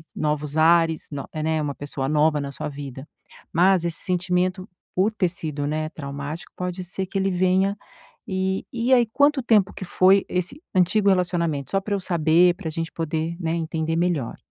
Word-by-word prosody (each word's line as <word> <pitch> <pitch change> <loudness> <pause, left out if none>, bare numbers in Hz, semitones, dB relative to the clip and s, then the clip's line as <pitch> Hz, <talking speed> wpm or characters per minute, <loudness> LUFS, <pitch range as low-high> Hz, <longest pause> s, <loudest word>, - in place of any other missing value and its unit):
novos 150 -1 -2
ares, 165 0 +3
no 140 -3 -6
é 155 - -4
né, 160 0 0
uma 145 -1 -3
pessoa 140 -2 -4
nova 150 0 +3
na 140 -1 -4
sua - - -5
vida. 140 -1 -8 0.5
Mas 180 +1 +4
esse 170 0 -2
sentimento 180 +1 -1 0.3
por 190 +4 +3
ter 190 -5 +1
sido, 155 -4 -4
né, 155 +1 -1
traumático 145 +1 -6
pode 180 0 -4
ser 190 +1 -4
que 195 - -8
ele 195 0 +1
venha. 185 +2 +2 0.5
E 190 0 -1
e 240 +1 0
aí, 240 -2 +4
quanto 285 +4 +2
tempo 215 -5 +3
que - - -6
foi 190 +2 +4
esse 180 - -3
antigo 195 +3 +3
relacionamento? 170 -7 0
Só 195 - +2
pra 205 +1 -3
eu 200 - -1
saber, 175 0 +3
pra 180 -5 -5
gente 165 +1 -4
poder, 160 +1 -2
né, 165 -2 -1
entender 160 -1 -2
melhor. 165 -8 0
170 Hz, 180 wpm, -23 LUFS, 155-190 Hz, 0.5 s, Mas